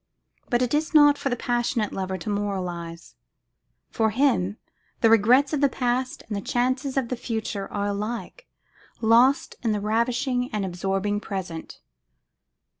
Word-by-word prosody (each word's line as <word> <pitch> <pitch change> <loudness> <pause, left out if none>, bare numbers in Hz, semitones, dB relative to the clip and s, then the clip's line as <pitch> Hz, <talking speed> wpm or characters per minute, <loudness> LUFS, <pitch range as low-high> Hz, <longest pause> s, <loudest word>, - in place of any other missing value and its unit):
But 240 +1 +2
it 245 - -1
is 310 +2 0
not 290 -1 +7
for 275 - -1
the 245 - 0
passionate 240 -2 -1
lover 190 0 -3
to 175 +4 -6
moralise. 180 -5 -4 0.8
For 220 -1 +1
him, 220 -5 +1 0.4
the 225 - +5
regrets 250 +7 +5
of 295 - 0
the 280 - +4
past 255 0 -2
and 215 - -4
the 200 - -3
chances 255 +5 -1
of 255 -3 0
the 255 - -1
future 220 -4 -4
are 205 -1 -2
alike 215 - -4 0.5
lost 240 +5 +3
in 225 -3 +1
the 210 - -1
ravishing 245 +4 0
and 210 -2 -1
absorbing 195 +3 -1
present. 185 -6 -6
225 Hz, 150 wpm, -25 LUFS, 200-255 Hz, 0.8 s, not